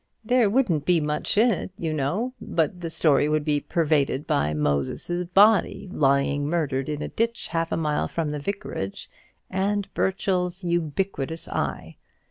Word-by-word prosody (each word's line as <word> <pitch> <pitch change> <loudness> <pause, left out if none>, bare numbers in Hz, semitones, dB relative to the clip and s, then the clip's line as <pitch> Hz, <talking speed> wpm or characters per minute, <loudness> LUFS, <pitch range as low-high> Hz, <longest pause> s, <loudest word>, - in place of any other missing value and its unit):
"There 245 -2 +3
wouldn't 200 - +1
be 175 +1 +3
much 150 +7 -1
in 235 +3 +5
it, 195 - -3
you 160 -2 -2
know; 175 - -1
but 170 +2 -1
the 165 - -3
story 150 -2 +3
would 155 -1 0
be 150 -2 +2
pervaded 150 -4 0
by 75 +1 +1
Moses's 75 - -1
body 200 +3 +4
lying 140 0 +2
murdered 145 -5 -1
in 150 0 -3
a - - -3
ditch 230 +1 -2
half 165 0 -1
a - - 0
mile 150 -2 0
from 160 -3 -2
the 150 - -3
vicarage, 145 - -5 0.4
and 195 +1 -1
Burchell's 185 -1 -1
ubiquitous 170 -2 -2
eye. - - -3
165 Hz, 155 wpm, -25 LUFS, 145-190 Hz, 0.4 s, in